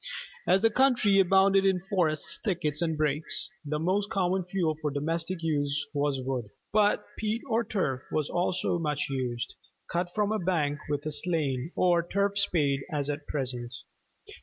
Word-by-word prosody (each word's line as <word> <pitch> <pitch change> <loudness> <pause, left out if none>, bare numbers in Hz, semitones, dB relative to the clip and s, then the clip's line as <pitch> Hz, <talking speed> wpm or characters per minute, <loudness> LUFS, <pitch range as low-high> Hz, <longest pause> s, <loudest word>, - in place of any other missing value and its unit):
As 190 +3 +4
the 225 - +5
country 235 -5 +4
abounded 195 +1 +5
in 190 -2 +3
forests, 175 -6 -1
thickets, 170 -7 -1
and 160 -2 0
brakes, 150 +6 +1
the 150 0 -2
most 190 +6 0
common 190 -2 +1
Fuel 180 -4 0
for 150 - 0
domestic 165 +5 -2
use 145 -2 0
was 145 -2 0
wood: 125 -5 -3 0.2
but 210 -1 +3
peat 220 +1 -1
or 230 -1 +2
turf 135 - -1
was 155 -2 0
also 175 0 0
much 150 -3 -1
used, 125 -3 -2 0.4
cut 175 +1 -1
from 210 +2 0
a 215 - 0
bank 155 -5 0
with 145 0 -2
a 155 - -1
slaan 150 -3 0
or 175 -2 +4
turf 200 +3 0
spade 150 -8 +2
as 145 -1 0
at 145 0 -6
present. 125 -3 -3
165 Hz, 160 wpm, -28 LUFS, 145-195 Hz, 0.4 s, the